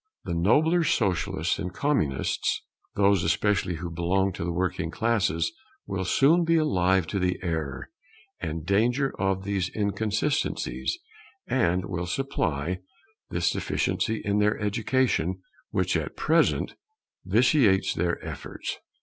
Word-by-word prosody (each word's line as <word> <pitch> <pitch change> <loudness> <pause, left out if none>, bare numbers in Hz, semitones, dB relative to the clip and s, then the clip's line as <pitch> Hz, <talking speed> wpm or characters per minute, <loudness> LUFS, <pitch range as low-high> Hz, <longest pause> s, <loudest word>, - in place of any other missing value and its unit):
The - - -3
nobler 150 - +3
socialists 90 - 0
and 90 -2 -3
communists, 90 - 0 0.3
those 100 -2 +3
especially 90 +1 +1
who 85 +1 -5
belong 95 +3 +1
to - - -5
the 85 - -1
working 90 -1 -1
classes, 110 -5 +1 0.3
will 95 -1 -3
soon 155 - +4
be 165 0 +3
alive 95 - +2
to 100 +5 -2
the 90 0 0
error 80 - -3 0.5
and 80 -1 -4
danger 120 - +2
of 95 -1 0
these 95 -2 -1
inconsistencies, 110 - -1 0.5
and 90 -8 +1
will 90 -1 -3
supply 90 - -1 0.5
this 85 0 +1
deficiency 110 0 -1
in 100 0 +1
their 105 +1 +2
education, 105 -4 0 0.3
which - - 0
at - - -3
present 165 +2 +2 0.5
vitiates 105 - +3
their 85 0 0
efforts. - - -6
95 Hz, 125 wpm, -26 LUFS, 85-115 Hz, 0.5 s, soon